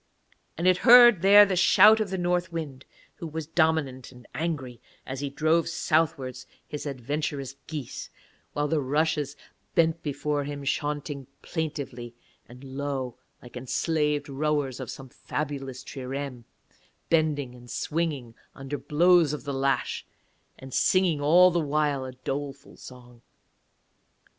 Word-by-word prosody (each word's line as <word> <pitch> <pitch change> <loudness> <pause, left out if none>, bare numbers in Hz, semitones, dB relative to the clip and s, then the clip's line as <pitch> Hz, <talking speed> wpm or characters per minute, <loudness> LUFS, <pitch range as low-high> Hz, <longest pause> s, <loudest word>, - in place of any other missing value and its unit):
And 170 - -2
it 185 -1 +5
heard 240 -4 +8
there 205 +2 +8
the 195 -2 -1
shout 215 +4 +6
of 215 -2 -1
the 190 - -3
North 175 0 0
Wind, 145 -6 -6 0.3
who 170 - -6
was 160 0 -5
dominant 160 -6 0
and 125 -1 -16
angry, 145 -8 -4 0.2
as 130 0 -5
he 140 0 -3
drove 160 +4 +1
southwards 155 -6 -1 0.2
his 150 0 -6
adventurous 140 +1 -3
geese; 150 -6 -6 0.4
while 145 0 0
the 155 -1 0
rushes 150 +1 0 0.4
bent 165 0 +2
before 145 0 -2
him 140 0 -6
chaunting 145 -1 -3 0.2
plaintively 140 -7 -5 0.3
and 125 +2 -13
low, 135 -2 -4 0.2
like 120 - -13
enslaved 150 +3 -1
rowers 145 -2 -1
of - - -6
some 135 -1 -9
fabulous 135 -1 -5
trireme, 135 -2 -6 0.7
bending 150 -5 +1
and 120 0 -14
swinging 150 -8 -3 0.2
under 135 +2 -5
blows 170 0 +4
of 145 -5 -5
the 140 0 -4
lash, 135 0 -1 0.5
and 130 -1 -11
singing 180 -6 +2
all 175 +5 +6
the 175 - +1
while 145 -3 0
a 130 - -7
doleful 140 +2 -6
song. 125 -2 -14
145 Hz, 135 wpm, -26 LUFS, 135-160 Hz, 0.7 s, heard